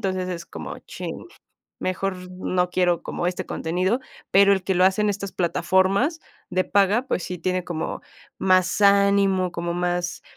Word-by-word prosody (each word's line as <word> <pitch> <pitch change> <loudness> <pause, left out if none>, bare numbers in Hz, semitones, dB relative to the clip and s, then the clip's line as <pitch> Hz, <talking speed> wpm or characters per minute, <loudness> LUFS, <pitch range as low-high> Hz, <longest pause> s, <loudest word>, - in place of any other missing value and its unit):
Entonces, 185 -1 -2
es 170 -2 -5
como - - -7
chin, - - -7 0.5
mejor 185 +1 -2 0.2
no 180 -1 -1
quiero 180 -1 +1
como 175 - -3
este 180 - -4
contenido, 185 +9 -1 0.3
pero, 200 +1 +6
el 190 -2 0
que 190 - 0
lo 180 +1 +4
hace 190 +3 +3
en 210 - +2
estas 200 -1 -5
plataformas 190 - +1 0.3
de 185 +1 +1
paga, 205 +6 +2
pues - - -1
sí 180 -1 -5
tiene 185 +1 -1
como 165 -3 -4 0.4
más 185 +1 +2
ánimo, 200 -2 +4
como 170 0 -3
más, 175 0 -2
185 Hz, 160 wpm, -23 LUFS, 180-200 Hz, 0.5 s, pero